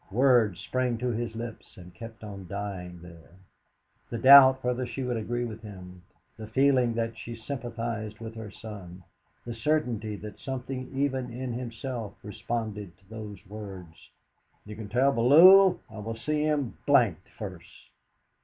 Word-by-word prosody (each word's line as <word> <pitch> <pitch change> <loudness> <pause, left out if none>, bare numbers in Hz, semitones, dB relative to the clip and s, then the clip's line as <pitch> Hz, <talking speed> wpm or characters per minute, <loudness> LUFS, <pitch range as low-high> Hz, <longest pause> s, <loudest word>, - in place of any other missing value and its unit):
Words 120 -4 +3
sprang 130 -2 -1
to 125 +2 -2
his 115 -1 -3
lips, 115 0 -8
and 90 -1 -12
kept 115 +5 -10
on 100 -3 -8
dying 95 -3 -6
there. 85 -1 -14 0.8
The 115 - -3
doubt 130 +1 +8
whether 125 0 -1
she 120 +3 -5
would 125 -1 -1
agree 120 +2 -2
with 110 -1 -7
him, 90 -4 -11 0.4
the 110 -1 -8
feeling 125 0 +3
that 115 0 -2
she 120 0 -7
sympathised 115 -3 -5
with 115 0 -8
her 110 -2 -8
son, 95 -4 -10 0.4
the 120 - -5
certainty 115 -4 -1
that 105 0 -9
something 130 -1 -5
even 135 -2 0
in 125 +1 -4
himself 120 -2 -5
responded 105 -2 -5
to 95 0 -29
those 105 -3 -9
words: 95 -5 -10 0.6
"You 105 0 -8
can 105 -1 -8
tell 130 +5 +3
Bellew 175 +11 +7
I 110 -2 -10
will 110 +2 -5
see 150 +5 -1
him 150 -5 -1
d 145 - +3
d 110 -9 0 0.2
first!" - - -10
115 Hz, 155 wpm, -28 LUFS, 105-125 Hz, 0.8 s, doubt